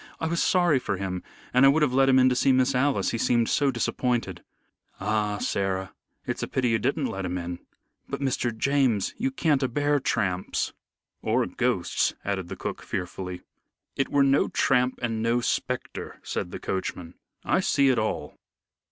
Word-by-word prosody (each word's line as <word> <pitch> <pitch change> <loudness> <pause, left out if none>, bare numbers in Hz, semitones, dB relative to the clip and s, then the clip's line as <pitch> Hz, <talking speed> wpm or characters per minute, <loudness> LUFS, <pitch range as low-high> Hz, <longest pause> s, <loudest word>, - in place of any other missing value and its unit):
I - - -2
was 170 +1 0
sorry 175 -7 +3
for 100 -6 -2
him, 90 -1 -3 0.3
and 125 +2 +5
I 135 - +8
would 150 +2 +3
have 135 -4 +1
let 135 +1 +4
him 130 - +5
in 130 0 +6
to 125 - +1
see 135 +2 +3
Miss 130 +1 +3
Alice, 135 +2 +1
he 115 - -2
seemed 120 -1 +2
so 145 -1 +2
disappointed." 120 -6 -1 0.6
"Ah, 105 +1 0
Sarah, 95 -2 -2 0.3
it's - - -3
a - - -2
pity 130 -2 0
you 115 -1 +2
didn't 140 +3 0
let 95 -5 -3
him 90 0 -2
in." 85 0 -5 0.5
"But, - - -3
Mr. 135 -3 0
James, 130 -7 +1
you 260 +4 +1
can 160 - +1
a 130 - +2
bear 145 +3 +1
tramps." 95 -8 -1 0.5
"Or - - +1
ghosts," - - 0
added 95 -3 -2
the 95 - -6
cook, - - -5
fearfully. 90 0 -5 0.5
"It 135 - 0
were 140 -1 +3
no 135 0 +3
tramp 125 -1 +2
and 115 -2 -1
no 115 +2 +2
spectre," 120 - -3
said - - -3
the - - -6
coachman. 90 -2 -4 0.3
"I - - +2
see 140 -1 +3
it 125 - +3
all." 110 -8 -3
120 Hz, 185 wpm, -26 LUFS, 95-135 Hz, 0.6 s, I